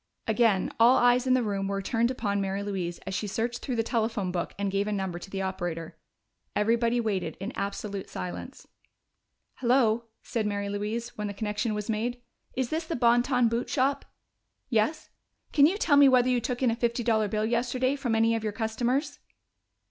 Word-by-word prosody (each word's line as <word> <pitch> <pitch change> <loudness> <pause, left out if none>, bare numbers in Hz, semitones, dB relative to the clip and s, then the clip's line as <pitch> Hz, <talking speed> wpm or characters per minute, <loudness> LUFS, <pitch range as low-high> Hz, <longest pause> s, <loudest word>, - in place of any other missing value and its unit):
Again 220 -4 +2
all 240 +3 +7
eyes 245 +1 +4
in 255 - +5
the 255 - +2
room 200 -2 -1
were 195 0 -1
turned 230 +4 +1
upon 205 -6 -1
Mary 195 +1 -2
Louise 185 -4 -3
as 190 - -4
she 210 +3 -2
searched 230 +4 -2
through 255 - -3
the 225 - +1
telephone 220 -5 -1
book 175 -1 -3
and 200 -1 -1
gave 200 +1 0
a - - -1
number 190 -4 -2
to 185 - -10
the 195 0 -3
operator. 175 -3 -4 0.6
Everybody 230 +3 +2
waited, 210 -5 -2
in 195 +5 -4
absolute 200 -2 -4
silence. 90 -1 -7 0.9
"Hello," 235 -2 +2 0.2
said 225 -4 -2
Mary 200 -1 -2
Louise 210 +4 -3
when 210 - -1
the 200 - -6
connection 210 +1 -2
was 210 -1 -4
made. 235 +3 -2 0.4
"Is 260 -2 -1
this 320 +1 -1
the 330 - -2
Bon 240 0 +4
Ton 250 -2 +2
Boot 230 +2 -1
Shop? 275 +1 +1 0.7
Yes? 225 +6 0 0.4
Can 290 -1 +7
you 375 +5 0
tell 300 -8 +3
me 285 -1 +8
whether 255 -1 +4
you 250 -1 +2
took 245 +2 -3
in 245 - +4
a - - -1
fifty 235 0 -1
dollar 220 -2 +2
bill 215 +1 -1
yesterday 250 +3 0
from 245 -5 -1
any 225 +1 +3
of 225 - -3
your 215 -1 -2
customers?" 245 +7 -1
225 Hz, 195 wpm, -28 LUFS, 200-245 Hz, 0.9 s, me